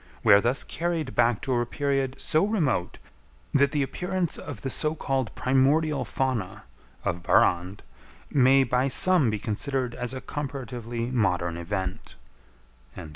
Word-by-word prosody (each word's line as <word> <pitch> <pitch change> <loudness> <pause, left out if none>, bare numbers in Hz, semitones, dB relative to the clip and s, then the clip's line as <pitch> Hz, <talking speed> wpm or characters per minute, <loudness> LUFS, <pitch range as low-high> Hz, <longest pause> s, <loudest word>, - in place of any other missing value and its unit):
We - - +7
are 100 - +7
thus 120 +4 +1
carried 165 -4 -3
back 120 -2 +2
to 130 - -1
a 120 -1 +2
period 135 -1 -1
so 155 - +1
remote, 170 - 0 0.6
that 140 0 +3
the 145 -2 +1
appearance 180 +4 -2
of 130 -8 -8
the 135 - -2
so 155 +4 +1
called 135 -6 -1
primordial 140 +4 +2
fauna 130 -8 -2 0.4
(of 85 0 -1
Barrande) 90 +3 +2 0.5
may 135 0 +5
by 125 +1 +1
some 160 0 +3
be 110 - -1
considered 125 +4 -2
as 125 +2 -3
a - - -4
comparatively 125 -5 -5
modern 90 -8 0
event." 95 +2 -5
130 Hz, 140 wpm, -26 LUFS, 115-145 Hz, 0.6 s, We